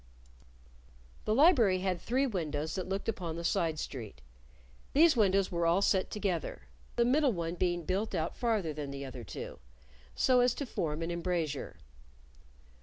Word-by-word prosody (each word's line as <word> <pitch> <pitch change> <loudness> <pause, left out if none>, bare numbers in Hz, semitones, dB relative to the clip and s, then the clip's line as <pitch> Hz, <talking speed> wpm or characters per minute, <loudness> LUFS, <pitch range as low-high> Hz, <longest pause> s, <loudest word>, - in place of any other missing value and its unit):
The 215 - +1
library 245 - +5
had 185 -3 -1
three 260 +4 +1
windows 155 - -2
that 185 -1 -4
looked 195 +1 -3
upon 180 -8 -3
the 170 - -5
side 165 -2 +1
street. 115 - -6 0.7
These 315 +2 +6
windows 195 -4 +3
were 170 -1 +1
all 175 +4 +3
set 190 -2 +2
together, 190 - -3 0.3
the 235 - +3
middle 270 +1 +3
one 170 -2 -3
being 175 -1 0
built 195 +4 -1
out 160 -1 -2
farther 215 -10 0
than 145 -1 -5
the 140 0 -6
other 130 -2 -8
two, 85 - -7 0.6
so 255 -1 +4
as 245 0 +3
to 285 - -3
form 165 -8 -2
an 165 - -2
embrasure. 170 -4 -2
180 Hz, 160 wpm, -31 LUFS, 160-220 Hz, 0.7 s, These